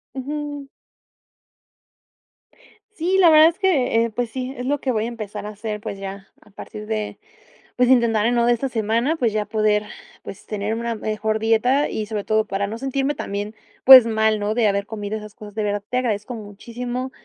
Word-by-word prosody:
Ujú. 290 +1 -5 2.3
Sí, 365 +1 0
la 360 -3 +7
verdad 315 +1 +8
es 340 - -9
que, 250 - +2
pues 245 -2 -1
sí, 255 +2 -5
es 250 - -5
lo 290 +2 0
que 265 - -1
voy 215 - 0
a - - -3
empezar 215 -3 -6
a - - -5
hacer, 210 0 -6
pues 205 -3 -6
ya, 195 0 -7
a - - -21
partir 210 +1 -9
de, 215 - -3 0.6
pues 250 0 +3
intentar 235 -4 +3
de 235 - +2
nuevo 235 -1 +2
de 240 - +4
esta 260 +3 -2
semana, 230 +6 0
pues 235 -8 0
ya 210 -1 -1
poder, 215 -1 +1 0.4
pues 195 - -10
tener 210 +1 -3
una 235 0 -2
mejor 215 0 -2
dieta 230 +6 +2
y 215 - -3
sobre 210 -1 -4
todo 220 0 +1
para 200 0 -2
no 220 +3 -5
sentirme 270 +3 -1
también, 205 -3 -5 0.3
pues 260 -2 +11
mal, 220 -1 +1
¿no? 205 +1 -1
De 230 -1 +2
haber 200 0 0
comido 210 -1 -5
esas 210 -1 -10
cosas. 210 -1 -12
De 215 - -1
verdad, 205 0 -1
te 250 - -1
agradezco 230 -1 -2
muchísimo, 240 +5 -6
225 Hz, 195 wpm, -22 LUFS, 210-255 Hz, 2.3 s, pues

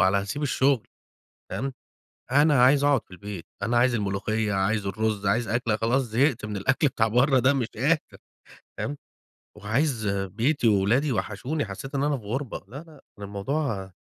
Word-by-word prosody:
على 95 +1 +4
هاسيب 100 +10 -4
الشغل" 135 -3 +2 0.6
فاهم، 125 +9 -3 0.6
أنا 145 -2 +5
عايز 140 +2 +5
أقعد 145 -4 +3
في - - -28
البيت، 95 -1 -8 0.2
أنا 120 +4 +1
عايز 120 0 +3
الملوخية، 105 +1 -1
عايز 100 +2 0
الرز، 105 0 -1
عايز 110 +4 +1
أكلة، 115 0 0
خلاص 115 +5 +1
زهقت 120 +1 +1
من 105 -1 -4
الأكل 135 +8 +2
بتاع 115 -3 +1
برّه 130 +4 +3
ده 130 +3 +4
مش 125 -4 -1
قادر، 150 +8 +2 0.8
فاهم، 145 +1 -3 0.6
وعايز 115 0 0
بيتي 110 - 0
وولادي 110 +8 +3
وحشوني 125 +7 -2
حسيت 120 +8 -7
إن 135 - +1
أنا 145 -1 +1
في 110 - -12
غُربة، 125 +4 -3
لا، 130 +6 -9
لأ، 155 -2 -12 0.2
كان 100 - -7
الموضوع 100 0 -3
115 Hz, 165 wpm, -26 LUFS, 100-135 Hz, 0.8 s, أنا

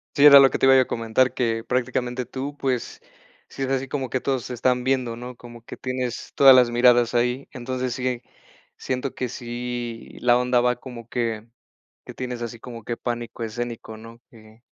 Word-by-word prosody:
Sí, 145 -1 +5
era 140 -1 +11
lo 135 - +7
que - - -2
te - - +3
iba 135 0 +7
yo 130 - +7
a 130 - +1
comentar, 115 +3 +1
que 115 -3 -1
prácticamente 125 +1 -2
tú, 135 +4 -6
pues, 130 -4 -2 0.5
si 135 - -10
es 135 - -1
así 135 0 -1
como 135 -2 -3
que 130 - -1
todos 130 -2 -2
te 125 - -6
están 125 +1 +1
viendo, 130 -3 0
¿no?, 125 +1 -9
como 120 -1 -13
que - - -10
tienes 125 -2 -4
todas 135 -1 +8
las 125 -2 +5
miradas 120 0 +4
ahí. 125 +3 0
Entonces, 130 0 -3
sí, 125 +1 -5
eh, 125 -2 -2 0.5
siento 130 +1 -4
que 125 - -3
sí 120 -1 -6
la 120 0 +4
onda 125 0 +2
va 125 0 +2
como 120 -2 -10
que 115 -2 -3 0.6
que - - -10
tienes 125 -2 -5
así 120 0 -6
como 115 -3 -9
que 120 - -3
pánico 120 -1 -4
escénico, 115 0 -6
¿no? 115 +1 -12 0.2
Ujú. 110 0 -18
125 Hz, 205 wpm, -23 LUFS, 120-130 Hz, 0.6 s, era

